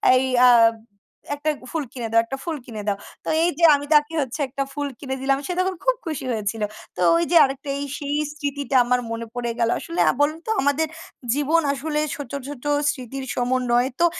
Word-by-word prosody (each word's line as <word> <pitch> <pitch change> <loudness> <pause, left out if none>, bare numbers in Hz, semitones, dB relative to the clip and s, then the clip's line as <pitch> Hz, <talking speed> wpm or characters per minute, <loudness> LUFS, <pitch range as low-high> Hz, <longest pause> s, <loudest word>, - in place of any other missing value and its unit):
"এই 255 - +3 0.2
আ - - +8 0.9
একটা 295 +2 -2 0.2
ফুল 320 -2 -1
কিনে 240 -3 -4
দাও 230 - +5
একটা 270 +4 -5
ফুল 330 -3 -3
কিনে 220 -3 -7
দাও।" 200 - +2 0.3
তো - - -12 0.2
এই 345 - +4
যে - - -1
আমি 285 0 -4
তাকে 300 +1 +4
হচ্ছে 265 +2 -4
একটা 275 +1 -3
ফুল 290 0 -2
কিনে 265 -1 -4
দিলাম। 270 0 +2
সে - - -2
তখন 375 0 0
খুব - - +3
খুশি 310 -5 -4
হয়েছিল। 215 0 -2 0.3
তো - - -10 0.2
ওই 170 - +2
যে - - +3
আরেকটা 275 +1 -2
এই 285 - -3
সেই 290 0 -3 0.2
স্মৃতিটা 285 -2 -3
আমার 250 +1 +2
মনে 230 0 -4
পড়ে 240 -1 -2
গেল। 230 - +2
আসলে 335 +1 -5
আ - - +5
বলুন 305 +2 +1
তো 440 - 0
আমাদের 285 +3 +1 0.5
জীবন 295 +4 +2
আসলে 300 +2 -2 0.2
ছোট, 285 -4 -8 0.2
ছোট, 285 -4 -8 0.3
স্মৃতির 265 0 -7
সমন্বয়। 245 0 +1
তো 345 - +5
275 Hz, 205 wpm, -23 LUFS, 245-300 Hz, 0.9 s, আ